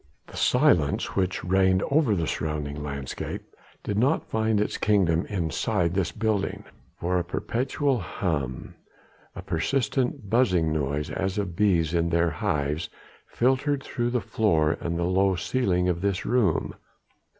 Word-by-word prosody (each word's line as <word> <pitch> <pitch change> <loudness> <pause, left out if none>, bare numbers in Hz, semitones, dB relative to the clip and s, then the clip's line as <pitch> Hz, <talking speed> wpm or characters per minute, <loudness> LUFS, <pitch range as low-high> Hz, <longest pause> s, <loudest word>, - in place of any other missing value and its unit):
The - - -14
silence 125 - +2
which 95 -1 0
reigned 95 0 +3
over 140 -8 +3
the 85 -3 -1
surrounding 75 -1 -3
landscape 70 -3 -5 0.4
did 105 0 -1
not 135 +7 +2
find 110 -1 0
its 105 - -1
kingdom 90 -6 +2
inside 90 0 -1
this 95 -3 0
building, 110 -3 -1 0.4
for 90 +1 0
a - - -1
perpetual 130 - -1
hum, 80 - -3 0.6
a - - -7
persistent 125 - -1
buzzing 90 -9 +2
noise 75 0 -2
as 95 +3 -2
of 95 -5 -2
bees 85 -6 +2
in 85 -1 +1
their 85 0 +2
hives, 75 +2 -1 0.4
filtrated 135 +3 +1
through 120 -1 -2
the 125 -1 0
floor 80 -10 +1
and 85 0 -2
the 85 - -1
low 95 +2 +2
ceiling 90 -2 0
of 85 -1 0
this 100 -2 -1
room. 115 -10 +1
95 Hz, 140 wpm, -26 LUFS, 80-110 Hz, 0.6 s, reigned